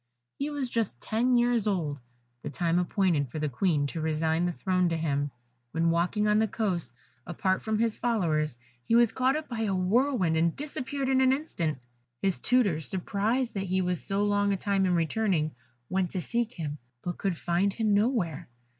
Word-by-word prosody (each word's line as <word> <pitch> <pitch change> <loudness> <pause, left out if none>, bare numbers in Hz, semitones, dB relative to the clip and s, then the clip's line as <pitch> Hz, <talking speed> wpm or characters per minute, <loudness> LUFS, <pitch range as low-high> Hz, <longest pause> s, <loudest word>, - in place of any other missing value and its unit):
He 285 +2 -1
was 290 -3 -2
just 225 - -1
ten 245 - +1
years 240 -3 +2
old, 160 -8 -1 0.4
the 145 - -5
time 170 +2 +1
appointed 175 - +1
for 140 - -6
the 150 0 0
Queen 150 +1 +1
to 160 +3 -4
resign 160 +2 +1
the - - 0
throne 185 0 +1
to 165 - -1
him, 145 -3 0 0.4
when, 165 +1 +2
walking 180 +5 +1
on 210 0 +4
the 220 - +3
coast, 190 - -2 0.4
apart 185 +2 0
from 220 -1 -1
his 225 0 +1
followers, 160 - 0 0.2
he 225 - +1
was 235 -2 +5
caught 260 +3 +2
up 310 0 -3
by 235 -3 -5
a 205 -3 0
whirlwind, 190 - +2
and 165 0 +2
disappeared 280 -1 -4
in 265 0 +3
an 260 0 +5
instant. 190 - -1 0.4
His 195 -2 0
tutors, 200 - +2
surprised 220 - -1
that 195 -1 -2
he 185 0 0
was 180 -2 -1
so 200 +1 0
long 205 0 +2
a 195 - +1
time 195 0 +1
in 180 - +2
returning, 165 -2 +1 0.3
went 185 -1 0
to 185 - -1
seek 235 +4 -1
him, 150 -3 -4 0.2
but 175 -1 -4
could 190 -4 -1
find 175 +4 +1
him 215 0 0
nowhere. 205 - 0
190 Hz, 190 wpm, -28 LUFS, 165-225 Hz, 0.4 s, was